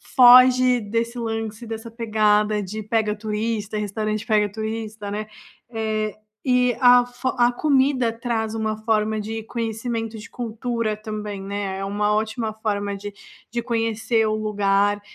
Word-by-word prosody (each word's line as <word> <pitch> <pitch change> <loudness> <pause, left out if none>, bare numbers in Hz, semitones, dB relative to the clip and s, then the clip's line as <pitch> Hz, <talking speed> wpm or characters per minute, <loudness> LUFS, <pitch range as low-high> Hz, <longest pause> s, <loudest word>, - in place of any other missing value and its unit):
foge 250 0 +7
desse 230 +3 -2
lance, 225 0 -4
dessa 225 +1 -6
pegada 215 -2 +2
de 215 +3 -5
pega 215 0 0
turista, 215 0 -3
restaurante 215 +1 -2
pega 210 -2 +2
turista, 220 -1 -5
né, 215 +1 -4 0.4
eh, 215 -2 -2 0.3
e 250 -2 +3
a 245 -1 +7
fo 245 +1 -3
a 240 0 +4
comida 265 -3 +2
traz 225 -1 -2
uma 220 -1 -1
forma 220 -1 +1
de 220 +1 -5
conhecimento 225 0 -3
de 215 - -10
cultura 230 -2 -3
também, 210 -2 -5
né, 195 0 -4
é 195 - -3
uma 210 +1 0
ótima 220 +1 -1
forma 205 -2 -2
de 205 +1 -7 0.4
de 235 +1 -2
conhecer 225 -1 0
o 215 - 0
lugar, 205 -1 +1
220 Hz, 145 wpm, -23 LUFS, 210-230 Hz, 0.4 s, foge